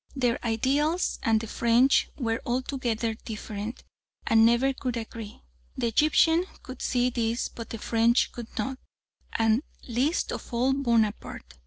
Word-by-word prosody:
Their 245 -3 0
ideals 275 +9 +1
and 225 -1 +3
the 225 - -5
French 235 +4 +3
were 230 -4 -1
altogether 240 -3 -1
different 215 0 -6 0.4
and 225 0 +5
never 235 +4 +4
could 250 -2 -3
agree. 225 -2 -8 0.3
The - - -1
Egyptian 320 +7 +4 0.2
could 255 - -9
see 250 0 +1
this 230 0 -1
but 230 -1 -9
the 225 - -5
French 230 +2 +2
could 235 -2 -7
not, 260 +5 -2 0.5
and 225 +2 +2 0.3
least 265 +8 0
of - - -6
all 250 +3 +2
Bonaparte. 225 - -1
235 Hz, 140 wpm, -27 LUFS, 225-260 Hz, 0.5 s, and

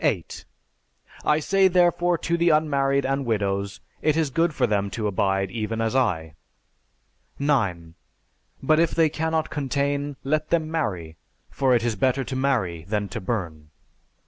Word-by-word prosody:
I 150 0 +3
say 190 +4 +3
therefore 175 -1 +3
to 170 - -1
the 170 0 +3
unmarried 140 -3 +2
and 135 +1 0
widows, 100 -4 -2 0.2
it 155 0 +2
is 155 -4 +1
good 165 +4 +2
for 135 -4 +1
them 100 -3 0
to 110 - -2
abide 95 -1 0
even 110 +1 -3
as 115 +1 -1
I. 85 -12 0 1.0
9. 100 - 0 0.7
But 155 +3 +3
if 170 - +2
they 165 -2 +4
cannot 160 0 -1
contain, 140 0 -1
let 155 +3 -1
them 160 -2 0
marry: 90 - -3 0.3
for 130 -2 +2
it 115 - +1
is 120 -2 0
better 130 +6 +1
to 130 - -5
marry 115 -12 0
than 105 +1 -2
to - - -5
burn. 85 -8 -4
135 Hz, 150 wpm, -24 LUFS, 100-155 Hz, 1.0 s, they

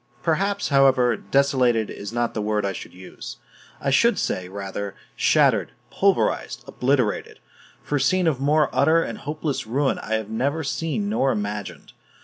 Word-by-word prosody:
Perhaps, 195 +5 0
however, 135 -4 +4
"desolated" 125 -1 +1
is 100 - -7
not 120 0 -1
the 110 - -2
word 105 -1 0
I 100 - -1
should - - -8
use; 95 +1 -10 0.4
I 140 - -1
should 235 - +4
say, 90 -1 -2
rather, 100 +1 -5 0.2
"shattered, - - +3 0.2
pulverized, - - +1
obliterated," 125 -4 -1 0.5
for 145 - -1
a - - -1
scene 185 +6 +2
of 155 -6 +1
more 150 +2 +2
utter 165 +1 +4
and - - -6
hopeless 150 -5 -3
ruin 135 +4 0
I 110 - -2
have 110 -1 -3
never 140 +9 -1
seen 165 +8 -2
nor 135 -11 +1
imagined. 105 -2 -5
130 Hz, 155 wpm, -23 LUFS, 105-150 Hz, 0.5 s, however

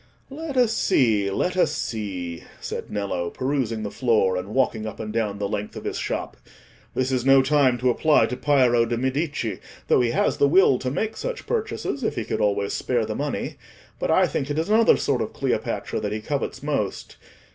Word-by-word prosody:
"Let 295 -1 -5
us 240 -3 +4
see, 110 - +2
let 180 - -1
us 185 - +3
see," 90 -6 -4 0.2
said - - -5
Nello, 100 -4 -2
perusing 130 -4 -2
the 105 - -4
floor, 110 -7 +2
and 90 +1 -3
walking 110 -1 0
up 110 - -7
and 110 -1 -5
down 105 -3 -1
the 100 0 -2
length 105 0 -4
of - - -7
his - - -3
shop. - - -3 0.6
"This 130 +1 0
is 130 -2 0
no 135 0 +6
time 135 -3 +3
to 125 +1 +2
apply 155 +5 +4
to 125 - -3
Piero 125 -4 +3
de' 120 - -1
Medici, 130 - -2 0.3
though - - +5
he 120 - +2
has - - +1
the 140 - +4
will 155 -4 +5
to 130 - -2
make 215 +11 -2
such - - -5
purchases 445 - -2
if - - -1
he 110 - -3
could - - -2
always 100 -1 +1
spare 120 -3 0
the 110 - -3
money; 145 +4 -3 0.4
but - - -1
I - - +5
think 135 - -2
it 145 - -2
is 160 +4 -1
another 225 +1 +5
sort - - 0
of - - -3
Cleopatra - - -2
that 105 - -3
he 110 - -2
covets 140 +3 -3
most... 140 -10 -3
125 Hz, 205 wpm, -24 LUFS, 105-145 Hz, 0.6 s, no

